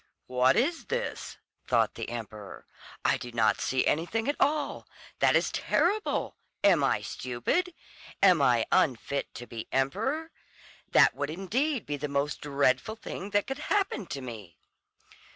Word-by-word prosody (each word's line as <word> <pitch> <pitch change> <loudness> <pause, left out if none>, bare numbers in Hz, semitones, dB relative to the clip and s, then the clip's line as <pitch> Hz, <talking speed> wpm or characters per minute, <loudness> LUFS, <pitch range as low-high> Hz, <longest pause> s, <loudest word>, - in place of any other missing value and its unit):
"What 125 +1 +3
is 315 +8 +1
this?" 485 +1 -4 0.3
thought - - +2
the - - -6
emperor, 110 -3 -8 0.4
"I - - +3
do 120 - -8
not 115 -2 +2
see 130 -1 +1
anything 195 - 0
at 290 - +1
all. 295 +1 0 0.3
That - - +4
is - - +2
terrible! 425 +1 0 0.3
Am - - +5
I - - +1
stupid? 130 - -2 0.4
Am 185 -6 +5
I 120 -4 +4
unfit 140 -4 +1
to 120 - -7
be 115 -2 -7
emperor? 225 - -1 0.6
That - - +6
would 145 0 -3
indeed 225 - -1
be 145 0 -3
the 150 +1 -3
most 140 +1 -1
dreadful 140 +6 +1
thing 200 -3 -7
that 205 0 +1
could 270 +1 -5
happen 390 - 0
to 140 - -5
me." 105 - -9
150 Hz, 150 wpm, -28 LUFS, -, 0.6 s, That